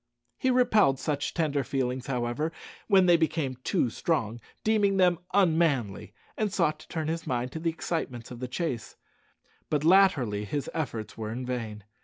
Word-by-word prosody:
He 260 - +1
repelled 220 - +4
such 145 +1 -2
tender 150 -5 +1
feelings, 130 0 -2
however, 125 +4 -1 0.4
when 195 -3 +5
they 175 -1 +6
became 155 -5 -1
too 120 - +1
strong, 120 -9 -1 0.2
deeming 205 -3 +2
them 180 -3 +4
unmanly, 160 - +2 0.2
and 215 -2 -1
sought 155 -6 +1
to - - -14
turn 160 -2 -3
his 165 0 -3
mind 125 -1 -1
to 160 - -5
the 165 +1 0
excitements 145 -8 -4
of 120 - -8
the 125 - -4
chase; 125 -4 -3 0.7
but 150 -1 0
latterly 155 - +4
his 140 +7 -3
efforts 115 -9 -4
were 110 -1 -3
in 125 +3 -4
vain. 115 -4 -4
150 Hz, 165 wpm, -28 LUFS, 125-170 Hz, 0.7 s, they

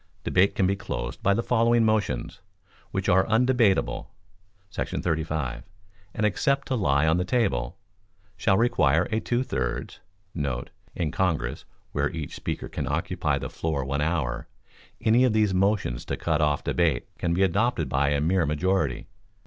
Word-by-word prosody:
Debate 95 +2 +3
can 95 - +2
be 95 +2 +2
closed 65 -9 -5
by 100 - +3
the 110 +4 +1
following 115 -1 +3
motions, 105 - -1 0.5
which - - -3
are 95 +2 +5
undebatable 115 -2 +2 0.6
[§ - - -3
35], 80 -7 -2 0.5
and, 110 - +1
except 140 +7 +1
to 130 - 0
Lie 75 - +2
on 80 +2 +3
the 90 - +1
Table, 90 - 0 0.6
shall 95 -1 +2
require 85 - +3
a 110 - +1
two 120 +3 0
thirds* - - -3 0.3
[In 70 +2 -4
Congress, 80 -8 -1 0.3
where 70 0 0
each 80 -5 -6
speaker - - -4
can - - -4
occupy - - -1
the - - -4
floor 75 -5 -2
one 70 +2 -1
hour, 75 -6 -1 0.5
any 115 +3 +4
of 125 -4 +3
these 105 -3 +2
motions 95 - +1
to - - -3
cut 80 -2 0
off 75 -1 +1
debate 80 -8 +1
can 85 -1 0
be 95 - +3
adopted 95 - +1
by 70 +2 +1
a 70 0 +1
mere 85 +2 +2
majority. 75 -1 0
85 Hz, 155 wpm, -26 LUFS, 70-105 Hz, 0.6 s, are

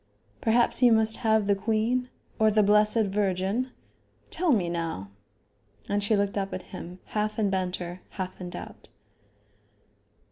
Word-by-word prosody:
Perhaps 235 +1 +3
you 245 -1 +7
must 220 0 +4
have 220 -3 +2
the 200 - +3
queen 225 +5 0 0.3
or 220 0 +5
the 215 0 +3
Blessed 210 +2 +4
Virgin? 195 +4 0 0.6
Tell 345 -1 +1
me 200 -9 +2
now?" 165 - -4 0.8
And 205 0 0
she 215 +2 +2
looked 200 0 0
up 195 0 -3
at 185 - -6
him, 175 +2 -7 0.2
half 215 0 -1
in 205 -3 +1
banter, 180 -1 -3
half 185 -1 -6
in 180 - -5
doubt. - - -9
205 Hz, 145 wpm, -27 LUFS, 185-220 Hz, 0.8 s, you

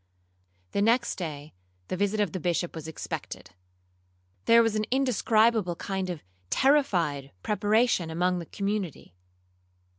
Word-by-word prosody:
The 200 - 0
next 230 +4 +2
day 150 -3 -6 0.3
the - - -2
visit 205 +3 0
of 205 -5 +1
the 185 - -4
Bishop 175 +1 -1
was 160 -1 -7
expected. 160 - -6 0.9
There 230 0 +7
was 225 -1 +1
an 215 0 0
indescribable 225 -6 +2
kind 190 +1 -3
of 175 -4 -5 0.3
terrified 180 - +2
preparation 210 -3 +2
among 180 +2 0
the 170 - -7
community. 200 - -3
195 Hz, 125 wpm, -27 LUFS, 170-220 Hz, 0.9 s, There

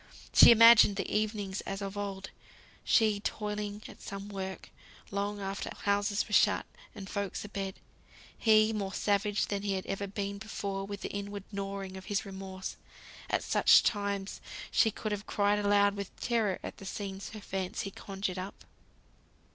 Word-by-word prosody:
She - - +10
imagined 230 -3 +8
the 195 - -2
evenings 210 -2 -1
as 195 0 -5
of 200 0 -5
old: 195 -2 -5 0.5
she, 215 -3 +3
toiling 210 0 -3
at - - -13
some 200 +1 -7
work, 190 -1 -6 0.4
long 200 +1 -2
after 195 0 -4
houses 205 0 +1
were 210 - -7
shut, - - +4 0.3
and 195 - -8
folks 200 -1 -3
abed; 195 -2 -4 0.6
he, 220 -1 +4
more 200 -2 -3
savage 205 0 +1
than 200 -1 -2
he 200 -1 -1
had 190 -1 -3
ever 200 +1 -3
been 200 0 -4
before 200 -2 -4
with 200 -1 -6
the - - -4
inward 200 0 -5
gnawing 195 -1 -5
of 190 - -10
his 205 -2 -1
remorse. 190 -1 -7 0.5
At - - +1
such - - +6
times 200 -2 -1 0.3
she 225 - +4
could 215 0 -4
have 205 0 -4
cried 205 0 +2
aloud 205 0 +3
with 200 -2 -7
terror, 225 -6 +1
at - - -6
the 195 - -10
scenes 195 -1 -5
her 215 - -8
fancy 195 0 -4
conjured 195 -1 -4
up. 190 +2 -8
200 Hz, 165 wpm, -31 LUFS, 195-210 Hz, 0.6 s, She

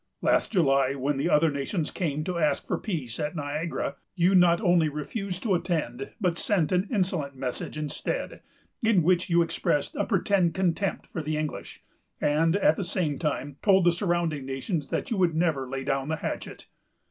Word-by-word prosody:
Last - - +2
July, 140 - +3
when 140 +1 -1
the 140 +5 0
other 155 0 +4
nations 145 +4 -2
came 155 -4 -2
to 175 +1 -2
ask 150 -3 +1
for - - -2
peace, 140 - -4
at 150 +2 -2
Niagara, 150 +2 -3 0.2
you 180 +1 +3
not 175 -2 +5
only 175 -6 +3
refused 180 +6 -4
to 215 -5 +1
attend, 155 -8 -2
but 180 -5 0
sent 180 -8 +1
an 185 +2 +2
insolent 180 - -1
message 130 +3 -4
instead, 155 - -3 0.4
in 220 -7 +3
which 180 +3 +2
you 170 0 +4
expressed 150 -3 -1
a - - 0
pretended 190 -4 +1
contempt 190 +1 0
for 165 - -2
the 155 0 -2
English; 155 -1 -5 0.4
and, 160 +4 +2
at 190 -5 +3
the - - -1
same 170 -6 -1
time, 145 -3 -2
told 190 -3 +5
the 175 - +6
surrounding 170 -5 -1
nations 135 +4 -3
that - - -3
you 225 - 0
would 175 -4 +2
never 155 -6 0
lay 135 0 -4
down 135 0 -1
the 160 - 0
hatchet. 155 - -5
165 Hz, 180 wpm, -27 LUFS, 145-180 Hz, 0.4 s, the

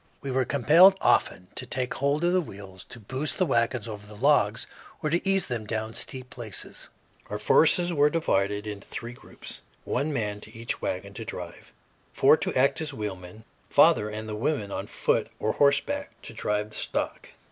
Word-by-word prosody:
We 135 - -3
were 130 0 +1
compelled 165 +9 +6
often 90 0 +2
to - - -7
take 125 -1 -1
hold 140 +3 0
of 175 +1 +3
the 185 - +3
wheels 100 - -10
to 120 - -11
boost 130 +7 -4
the 185 - +3
wagons 115 -4 0
over 105 -2 -8
the 105 0 -12
logs 115 -4 +3 0.4
or 150 - 0
to 175 +4 +1
ease 195 -1 +2
them 115 -4 -4
down 110 0 -3
steep 130 +1 -3
places. 115 -4 -4 0.4
Our - - -3
force 160 - +5
was 175 0 -1 0.2
divided 105 -10 0
into 105 -2 -7
three 120 +1 -6
groups, - - -10 0.2
one 150 +2 -1
man 105 -6 -2
to 110 +1 -10
each 115 0 -4
wagon 95 +2 -3
to 115 - -6
drive; 90 -5 -8 0.4
four - - +6
to - - -2
act 135 +4 +3
as 155 -2 -3
wheelmen; 100 -1 -6 0.3
father 105 - +5
and 110 +1 -6
the 110 - -4
women, 110 -3 -1
on - - -4
foot - - 0
or 110 - 0
horseback, 145 - +2
to - - -9
drive 105 0 -2
the 105 - -9
stock. - - -3
115 Hz, 190 wpm, -27 LUFS, 105-145 Hz, 0.4 s, compelled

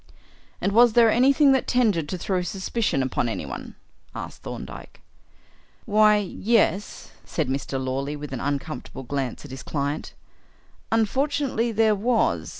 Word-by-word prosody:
"And 200 - 0
was 235 +2 +6
there 230 -1 +6
anything 275 +4 +5
that 265 -1 +2
tended 210 -11 +2
to 185 - -3
throw 185 +1 -1
suspicion 190 - -1
upon 125 -2 -1
anyone?" 70 - -6 0.4
asked - - -7
Thorndyke. - - -8 0.9
"Why, 215 0 +5
yes," 205 0 0
said 155 -5 -2
Mr. 135 0 -2
Lawley, 135 +3 -2
with 145 -1 -7
an 130 - -3
uncomfortable 135 -2 -4
glance 135 0 -4
at 145 - -11
his 130 0 -7
client, 145 0 -3 0.8
"unfortunately 240 +1 +1
there 220 0 +3
was. 205 - +1
195 Hz, 135 wpm, -24 LUFS, 140-230 Hz, 0.9 s, was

